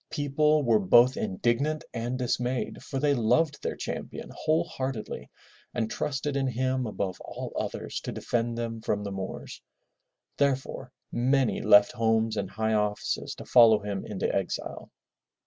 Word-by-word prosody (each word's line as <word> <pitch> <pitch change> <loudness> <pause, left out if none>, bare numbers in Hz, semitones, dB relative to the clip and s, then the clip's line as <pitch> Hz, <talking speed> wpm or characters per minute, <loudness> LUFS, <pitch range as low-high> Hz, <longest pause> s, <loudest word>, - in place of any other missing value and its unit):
People 150 +1 +2
were 115 -4 +4
both 120 +6 +5
indignant 120 +10 0
and 120 +2 -2
dismayed 125 0 -1
for 135 - -5
they 145 +1 +3
loved 140 +6 +2
their - - -2
champion - - -6
whole 160 +2 +1
heartedly 130 -8 -5 0.5
and 110 -2 -1
trusted 145 0 -2
in 135 -1 +1
him 130 0 0
above 95 -3 -3
all - - -7
others - - -4
to - - -5
defend 115 0 -2
them 115 -1 -4
from 105 -2 -1
the 100 - -4
Moors. 95 -1 -6 0.8
Therefore 135 -2 -1 0.2
many 130 +1 +2
left 100 0 +6
homes 110 -1 +1
and 100 -3 -2
high 110 +2 -1
offices 105 -1 -1
to - - -10
follow 115 -3 +7
him 100 -2 -3
into 100 -3 -2
exile. 95 -2 -3
120 Hz, 145 wpm, -28 LUFS, 110-135 Hz, 0.8 s, follow